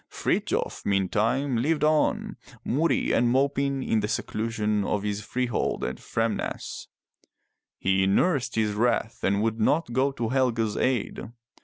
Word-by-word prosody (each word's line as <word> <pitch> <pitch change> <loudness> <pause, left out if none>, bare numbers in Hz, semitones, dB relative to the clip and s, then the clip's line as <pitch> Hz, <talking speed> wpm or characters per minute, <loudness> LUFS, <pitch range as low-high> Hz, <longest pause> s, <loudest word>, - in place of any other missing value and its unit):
Frithjof, - - -1
meantime, 110 +7 +1
lived 150 +5 +1
on, 155 0 +1 0.3
moody 155 +7 +1
and 120 0 +3
moping 140 +1 +1
in 110 - +1
the 105 - -1
seclusion 105 -1 -1
of 100 0 -1
his 105 0 -2
freehold 125 +1 -1
at - - -3
Framnas. 115 -1 -3 0.9
He 95 0 +2
nursed 135 - +1
his 110 -2 +1
wrath 115 +1 0
and 100 +2 +2
would 115 0 -1
not 135 +4 +1
go 135 +3 +2
to 115 -4 -2
Helge's 115 -5 +1
aid. 125 -2 -1
115 Hz, 135 wpm, -26 LUFS, 105-135 Hz, 0.9 s, and